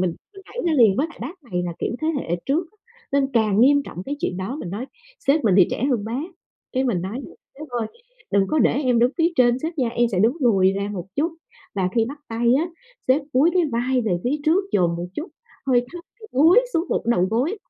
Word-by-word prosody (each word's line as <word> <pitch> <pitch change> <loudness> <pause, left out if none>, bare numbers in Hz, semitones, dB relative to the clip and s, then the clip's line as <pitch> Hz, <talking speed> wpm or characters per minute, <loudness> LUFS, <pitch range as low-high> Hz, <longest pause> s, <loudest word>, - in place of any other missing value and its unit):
mình 180 -2 0 0.2
mình 390 - -12
nhảy 485 - -10
ra 335 - +2
liền. 220 -7 +5
Với 295 - +1
lại 330 - -15
bác 315 +9 -7
này 180 -7 -2
là 175 - -3
kiểu - - -2
thế 315 - 0
hệ 175 - -2
trước 320 +5 0
á - - -31 0.4
nên 275 -1 +2
càng 220 -3 +3
nghiêm 285 +3 +5
trọng 180 - -8
cái 285 +1 -4
chuyện 180 - -2
đó. 190 +9 -4
Mình 180 - -6
nói 215 +7 -4 0.3
sếp 280 0 +2
mình 205 -4 +4
thì 180 - +7
trẻ 250 - -2
hơn 230 -5 0
bác, 235 +6 -3 0.5
cái 260 0 +1
mình 195 -9 0
nói: 205 +8 -4 0.4
"Sếp 305 +1 -8
ơi, 240 -2 -2 0.4
đừng 195 -1 +3
có 310 - +1
để - - +4
em 250 -3 +2
đứng 240 +2 +4
phía 330 +1 +4
trên 245 -2 +4
sếp 320 +1 -4
nha. 250 - +2
Em 240 0 +1
sẽ 180 - 0
đứng 230 +8 +3
lùi 195 -6 +4
ra 200 +1 -2
một 180 -2 -5
chút 315 +4 0 0.4
và 190 -2 0
khi 230 -2 +3
bắt 285 +2 -9
tay 235 +1 +2
á, 335 +3 -1 0.4
sếp 270 +4 +4
cúi 280 +7 +4
cái 360 - +4
vai 250 +2 +1
về 185 -6 0
phía 265 +4 +1
trước, 340 +5 +3
dồn 170 -3 +2
một 175 +1 -4
chút 320 - -5 0.4
hơi 245 -2 +3
thấp 350 -1 -8 0.2
kiểu 435 - -11
cúi 325 - +6
xuống 330 +2 0
một - - -1
đầu 185 -7 +3
gối 275 - 0
245 Hz, 250 wpm, -22 LUFS, 205-295 Hz, 0.5 s, thì